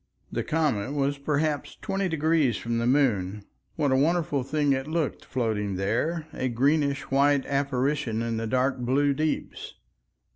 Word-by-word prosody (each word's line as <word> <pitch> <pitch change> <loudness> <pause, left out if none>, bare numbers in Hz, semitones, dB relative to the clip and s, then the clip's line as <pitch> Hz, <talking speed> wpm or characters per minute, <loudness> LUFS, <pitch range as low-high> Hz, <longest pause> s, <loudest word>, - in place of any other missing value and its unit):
The - - -2
comet 145 -7 0
was 140 0 0
perhaps 150 +1 -1
twenty 195 -2 -1
degrees 155 -6 +2
from 115 0 -2
the 115 - 0
moon. 105 -8 +1 0.3
What 145 -4 +1
a - - +4
wonderful 155 0 +1
thing 145 +2 +1
it 135 +1 -2
looked 160 -2 -2
floating 110 -6 -2
there, 120 - -1
a 130 - -2
greenish 140 +3 +1
white 140 0 +3
apparition 135 -4 0
in 115 -1 -2
the 115 0 -2
dark 130 +2 +1
blue 140 +4 +2
deeps! 155 +3 -3
140 Hz, 150 wpm, -26 LUFS, 120-150 Hz, 0.3 s, a